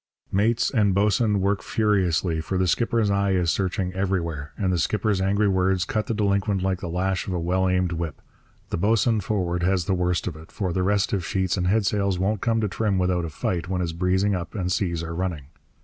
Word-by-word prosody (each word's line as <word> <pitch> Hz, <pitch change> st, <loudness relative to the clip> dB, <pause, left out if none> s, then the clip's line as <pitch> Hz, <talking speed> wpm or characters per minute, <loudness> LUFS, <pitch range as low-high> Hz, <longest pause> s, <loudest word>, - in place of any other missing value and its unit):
Mates 110 Hz, +4 st, +2 dB
and 105 Hz, -6 st, +2 dB
boatswain 105 Hz, 0 st, +2 dB
work 100 Hz, -1 st, +1 dB
furiously, 90 Hz, -6 st, +1 dB
for 95 Hz, +3 st, -3 dB
the 95 Hz, -, +2 dB
skipper's 115 Hz, +3 st, +1 dB
eye 100 Hz, -1 st, +1 dB
is 90 Hz, -3 st, +2 dB
searching 95 Hz, -1 st, -1 dB
everywhere, 85 Hz, -6 st, -2 dB
and 95 Hz, -2 st, 0 dB
the 90 Hz, -, 0 dB
skipper's 105 Hz, +3 st, 0 dB
angry 100 Hz, +2 st, +2 dB
words 95 Hz, -1 st, +1 dB
cut 105 Hz, +1 st, -2 dB
the 115 Hz, -, -1 dB
delinquent 100 Hz, -2 st, +1 dB
like 95 Hz, -1 st, 0 dB
the 90 Hz, -, -5 dB
lash 95 Hz, +2 st, -1 dB
of 95 Hz, -, -2 dB
a 90 Hz, -, -1 dB
well 95 Hz, +2 st, +1 dB
aimed 90 Hz, -1 st, +1 dB
whip. 85 Hz, -3 st, -4 dB, 0.5 s
The -, -, -1 dB
boatswain 110 Hz, +4 st, +2 dB
forward 95 Hz, -5 st, -1 dB
has 90 Hz, -1 st, +1 dB
the 95 Hz, -, 0 dB
worst 90 Hz, -1 st, 0 dB
of 85 Hz, -, -4 dB
it, 80 Hz, +1 st, -13 dB
for 95 Hz, -4 st, -2 dB
the 95 Hz, -, 0 dB
restive 100 Hz, 0 st, +1 dB
sheets 95 Hz, 0 st, 0 dB
and 90 Hz, -2 st, -1 dB
headsails 100 Hz, -1 st, +1 dB
won't 100 Hz, +3 st, 0 dB
come 115 Hz, -2 st, +1 dB
to 105 Hz, -, +1 dB
trim 100 Hz, +1 st, -1 dB
without 90 Hz, -2 st, +1 dB
a -, -, -4 dB
fight 85 Hz, +3 st, -2 dB
when 95 Hz, -1 st, -1 dB
it's 85 Hz, -2 st, -1 dB
breezing 95 Hz, +4 st, +1 dB
up 90 Hz, +3 st, -4 dB
and 90 Hz, -3 st, -2 dB
seas 85 Hz, -3 st, -1 dB
are 85 Hz, 0 st, -5 dB
running. 85 Hz, -6 st, -3 dB
95 Hz, 215 wpm, -24 LUFS, 90-100 Hz, 0.5 s, Mates